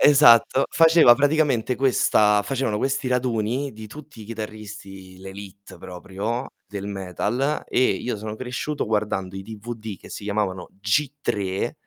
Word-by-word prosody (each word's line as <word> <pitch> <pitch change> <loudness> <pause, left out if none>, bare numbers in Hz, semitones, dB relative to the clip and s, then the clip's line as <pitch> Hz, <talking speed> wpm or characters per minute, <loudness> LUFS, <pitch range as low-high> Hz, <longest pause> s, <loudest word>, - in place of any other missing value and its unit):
Esatto, 135 -3 +6
faceva 165 -5 +7
praticamente 145 -4 +2
questa 105 -5 +3
facevano 120 -2 -1
questi 135 +2 -1
raduni 125 +1 -1
di 110 0 -10
tutti 150 0 -12
i - - -9
chitarristi, 105 -4 -9
l'élite 95 0 -11
proprio 95 +8 -5 0.2
del 100 -1 -6
metal, 105 - -2
e 125 - +1
io 125 - -3
sono 105 +1 -6
cresciuto 130 +5 -3
guardando 105 -3 -1
i 95 - -6
DVD 110 0 -7
che - - -14
si - - -8
chiamavano 100 -3 -2
G3, 105 -4 -1
110 Hz, 130 wpm, -23 LUFS, 100-130 Hz, 0.2 s, faceva